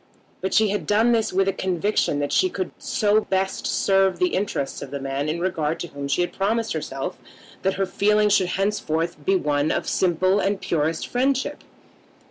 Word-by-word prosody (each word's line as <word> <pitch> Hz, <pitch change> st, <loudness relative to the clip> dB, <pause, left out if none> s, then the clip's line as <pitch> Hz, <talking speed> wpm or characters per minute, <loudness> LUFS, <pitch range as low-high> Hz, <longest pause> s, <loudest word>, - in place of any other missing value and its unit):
But 190 Hz, -, -1 dB
she 220 Hz, -1 st, +4 dB
had 195 Hz, -6 st, -2 dB
done 220 Hz, +3 st, +3 dB
this 225 Hz, -2 st, +1 dB
with 195 Hz, +1 st, +2 dB
a 195 Hz, -, +2 dB
conviction 185 Hz, -3 st, 0 dB
that 145 Hz, -, -2 dB
she 370 Hz, -, +3 dB
could 370 Hz, -, -4 dB
so 215 Hz, -1 st, +2 dB
best 190 Hz, -1 st, -1 dB
serve 195 Hz, -1 st, +2 dB
the 360 Hz, -, +2 dB
interests 185 Hz, -8 st, -2 dB
of -, -, -6 dB
the 140 Hz, -, -5 dB
man 135 Hz, +2 st, -2 dB
in 165 Hz, +2 st, -2 dB
regard 165 Hz, -3 st, -1 dB
to 175 Hz, -, -5 dB
whom 140 Hz, 0 st, -6 dB
she 140 Hz, +5 st, +1 dB
had 175 Hz, -, -2 dB
promised 225 Hz, +3 st, 0 dB
herself 150 Hz, +1 st, -4 dB, 0.4 s
that 190 Hz, 0 st, 0 dB
her 195 Hz, -, 0 dB
feeling 210 Hz, +2 st, +2 dB
should 195 Hz, -3 st, +3 dB
henceforth 170 Hz, -6 st, -1 dB
be 195 Hz, +6 st, +2 dB
one 150 Hz, -3 st, +1 dB
of -, -, -1 dB
simple 185 Hz, +2 st, +2 dB
and 200 Hz, 0 st, 0 dB
purest 160 Hz, 0 st, -1 dB
friendship. 265 Hz, +2 st, 0 dB
190 Hz, 190 wpm, -23 LUFS, 160-210 Hz, 0.4 s, she